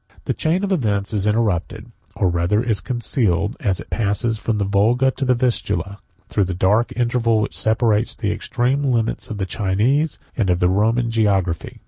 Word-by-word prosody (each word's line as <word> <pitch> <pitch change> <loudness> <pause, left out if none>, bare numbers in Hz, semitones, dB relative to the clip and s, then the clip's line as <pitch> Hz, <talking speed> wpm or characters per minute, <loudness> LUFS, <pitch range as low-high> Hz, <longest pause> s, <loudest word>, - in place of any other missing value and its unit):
] - - -26
The - - 0
chain 170 +5 0
of 200 - -1
events 105 - 0
is 105 -1 0
interrupted, 105 -5 -1 0.2
or 95 - +1
rather 90 +5 +1
is 110 -5 0
concealed, 110 -2 0
as 95 -7 -1
it - - -11
passes 110 +1 0
from 110 -1 -1
the 100 - 0
Volga 115 +7 +2
to 135 +1 -4
the 125 0 +3
Vistula, 115 -4 -1 0.3
through 100 - 0
the 90 -1 -4
dark 105 +6 +2
interval 120 -2 +1
which 105 - -2
separates 110 0 +1
the 105 -3 -2
extreme 125 +6 -1
limits 125 -3 -1
of 110 - -5
the 95 - -2
Chinese, 110 - 0 0.2
and 105 -6 0
of 90 - +3
the 90 0 +2
Roman, 115 +5 +1
geography. 100 -7 0
110 Hz, 185 wpm, -20 LUFS, 100-120 Hz, 0.3 s, the